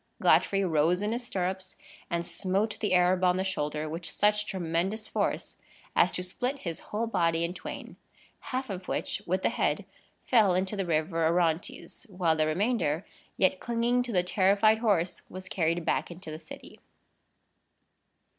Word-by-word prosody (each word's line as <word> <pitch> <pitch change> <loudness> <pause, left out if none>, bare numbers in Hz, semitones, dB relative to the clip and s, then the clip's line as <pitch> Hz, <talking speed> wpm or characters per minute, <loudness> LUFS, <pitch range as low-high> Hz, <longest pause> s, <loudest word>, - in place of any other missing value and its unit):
Godfrey 195 -1 +4
rose 170 +3 +2
in 210 - 0
his 240 +1 -3
stirrups, 185 -2 -3 0.3
and 170 -1 -1
smote 200 +4 -1
the 205 -4 +1
Arab 180 +1 +3
on 180 0 +4
the 190 - 0
shoulder 155 -5 -2
with 165 +3 -5
such 210 +3 +1
tremendous 190 +4 -2
force - - -2 0.4
as 180 - +5
to 180 - -1
split 250 +9 -3
his 165 -2 -3
whole 215 +2 -1
body 165 -6 +1
in 170 +1 -2
twain; 180 - -8 0.5
half 260 -2 -2
of 185 -1 -6
which, - - -2
with 185 +2 0
the - - +3
head, - - 0 0.4
fell 215 -7 +4
into 190 +3 0
the 195 -3 -2
river 165 +1 0
Orontes, 170 0 -1
while 180 -4 +1
the 155 -1 +1
remainder, 175 -2 0 0.3
yet 185 -1 +3
clinging 240 +1 +1
to 245 -1 -4
the 180 -4 +2
terrified 200 +4 +3
horse, 200 -7 +1
was 185 0 -8
carried 170 -2 0
back - - 0
into 175 -1 -9
the 155 - -6
city. 160 - -12
185 Hz, 165 wpm, -29 LUFS, 170-210 Hz, 0.5 s, as